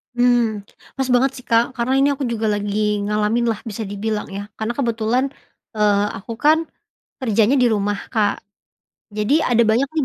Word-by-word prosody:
Mmm, 240 -4 +2 0.3
pas 265 -1 -1
banget 250 +2 +3
sih, - - -34
Kak, 235 +3 +2
karena 240 +2 0
ini 275 - +4
aku 275 0 -5
juga 230 -3 -1
lagi 205 0 0
ngalamin 210 +3 0
lah 210 - -5
bisa 220 +1 -4
dibilang 210 +2 -3
ya 200 +1 -6
karena 220 +2 -3
kebetulan, 235 0 0 0.5
eee, 205 -1 +3
aku 230 +4 -7
kan, 315 +4 +4 0.6
kerjanya 230 +1 +2
di 250 - +4
rumah, 205 -2 0 0.2
Kak, 215 -3 +1 0.8
jadi 215 +9 +2
ada 235 0 +5
banyak 230 +5 +2
nih 305 -4 +1
225 Hz, 165 wpm, -20 LUFS, 210-245 Hz, 0.8 s, ada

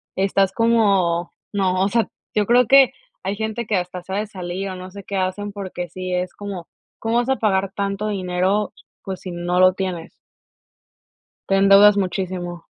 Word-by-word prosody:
estás 195 0 +1
como: 195 -7 +2 0.2
"¡No!". 185 -2 +1
O 195 - +1
sea, 230 +1 +1 0.3
yo 210 - +2
creo 245 +1 +5
que 270 +1 +6 0.3
hay 200 - -2
gente 220 +2 -3
que 215 - +1
hasta 180 0 -4
se 190 - -7
ha - - 0
de 215 - -3
salir 190 -1 -5
o 185 - -5
no 185 0 -8
sé 200 +1 -10
qué 200 - -4
hacen 190 +2 -2
porque 185 -3 -6
sí 185 +2 -5
es 180 0 -2
como: 195 -4 -7 0.3
"¿Cómo 225 +1 0
vas 240 +1 +1
a 265 - +3
pagar 195 -3 0
tanto 200 +1 -2
dinero?". 190 +1 0 0.3
Pues 190 -2 -5
si 185 - -6
no 175 +1 -1
lo 185 0 +6
tienes. 185 -4 -4 1.4
Te 195 - +3
endeudas 195 +1 +7
muchísimo. 180 -2 -3
195 Hz, 185 wpm, -21 LUFS, 185-205 Hz, 1.4 s, endeudas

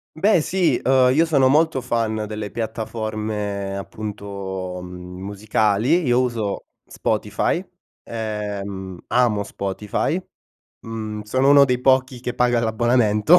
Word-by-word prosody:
Beh 185 +1 +4
sì, 185 +2 +1
uhm, 130 -1 +4
io 160 +4 +4
sono 140 -5 +4
molto 155 +1 +3
fan 115 -3 -1
delle 105 -1 -5
piattaforme 110 -3 -3
appunto, 100 -3 -5
mhmm, 90 0 -9
musicali. 110 - +1
Io 120 0 +3
uso 115 -5 -2 0.2
Spotify, - - -1 0.4
ehm, 100 -4 -4
amo 120 -5 +2
Spotify, 100 - -2 0.6
mhmm, 110 -1 -5
sono 130 +6 +1
uno 140 0 +8
dei 125 -2 0
pochi 130 -1 +2
che 125 -1 -4
paga 120 -1 +2
l'abbonamento. 115 +5 +4
110 Hz, 115 wpm, -22 LUFS, 100-125 Hz, 0.6 s, uno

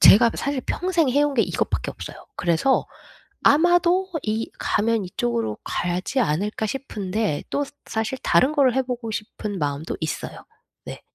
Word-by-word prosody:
제가 230 +3 +8
사실 280 -2 -2
평생 340 -6 +1
해 285 +3 +3
온 290 -1 +1
게 235 - +4
이것밖에 - - -1
없어요. - - -8 0.2
그래서 175 +10 +2 0.6
아마도 350 +4 +4
이 220 +1 -2
가면 220 -1 +1
이쪽으로 115 - -2
가야지 180 +9 -1
않을까 210 +3 0
싶은데 210 - -2
또 285 - +1 0.2
사실 220 +4 -2
다른 255 - +4
거를 270 -4 +3
해 265 - +3
보고 245 -3 -4
싶은 210 -2 -5
마음도 145 +1 -2
있어요. 160 - -4 0.4
네. - - -8
225 Hz, 305 characters per minute, -23 LUFS, 185-275 Hz, 0.6 s, 제가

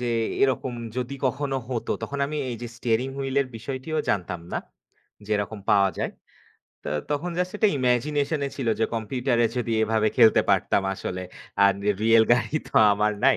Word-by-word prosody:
যে 120 -1 -1 0.3
এরকম 130 -1 +1 0.2
যদি 125 +2 -3
কখনো 135 +1 -1
হত। 120 -3 -3 0.2
তখন 140 - -4
আমি 150 +1 -4
এই 120 - -4
যে 120 - -4
স্টিয়ারিং 120 +2 0
হুইল 135 -1 -3
এর 135 - -1
বিষয়টিও 130 +7 -4
জানতাম 90 -3 -1
না। - - 0 0.7
যে 110 - -10
এরকম 105 +1 -4
পাওয়া 100 -1 +5
যায়। - - -1 0.7
তো - - -4 0.2
তখন 160 +5 -1
জাস্ট 180 +2 -1
একটা 215 0 +4
ইমাজিনেশন 140 +4 +1 0.2
ছিল 130 -5 -2
যে - - +4
কম্পিউটারে 120 +1 +1
যদি 115 -2 -1
এভাবে 110 0 +2
খেলতে 115 -3 +6
পারতাম 100 - +2
আসলে। 90 -1 -5 0.4
আর 100 - +6 0.3
রিয়াল 115 0 +6
গাড়ি 125 +5 +1
তো - - -22 0.2
আমার 105 +1 +1
নাই। 135 -4 +6
120 Hz, 170 wpm, -25 LUFS, 110-135 Hz, 0.7 s, খেলতে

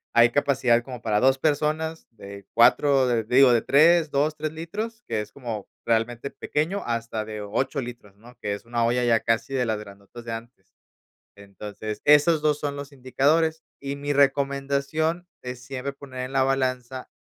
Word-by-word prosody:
hay 120 0 +6
capacidad 130 -4 +2
como 125 -3 -9
para 105 -2 +1
2 130 +3 +4
personas, 155 +2 -1
de 100 -3 -12
4, 130 +2 +4
eh, 115 -2 0
digo, 125 +2 +5
de 115 - +3
3, 160 +2 +4
2, 150 +2 0
3 155 0 -4
litros, 215 +9 -6
que 105 - -1
es 105 0 -9
como 115 -7 -6 0.2
realmente 115 +3 -1
pequeño 165 +7 -2
hasta 115 -2 -3
de 105 -1 -6
8 125 +7 -2
litros, 120 -5 -8
¿no?, 120 +3 -16
que 100 - -2
es 100 - -12
una 120 0 -1
olla 125 +1 +1
ya 115 -2 +3
casi 115 +5 -1
de 125 -2 +1
las 110 - 0
grandotas 100 +3 -12
de 115 - -5
antes, 115 -3 -9 0.7
entonces, 105 +2 -8
esos 150 +2 +5
dos 150 -1 +2
son 145 -1 -3
los 140 0 -8
indicadores 150 +5 +1 0.2
y 140 0 -4
mi 145 +1 -2
recomendación 140 +4 0
es 125 -1 -6
siempre 135 +1 -5
poner 135 -2 -9
en 130 +1 -5
la 135 -1 +2
balanza, 130 -1 -2
130 Hz, 180 wpm, -25 LUFS, 115-145 Hz, 0.7 s, hay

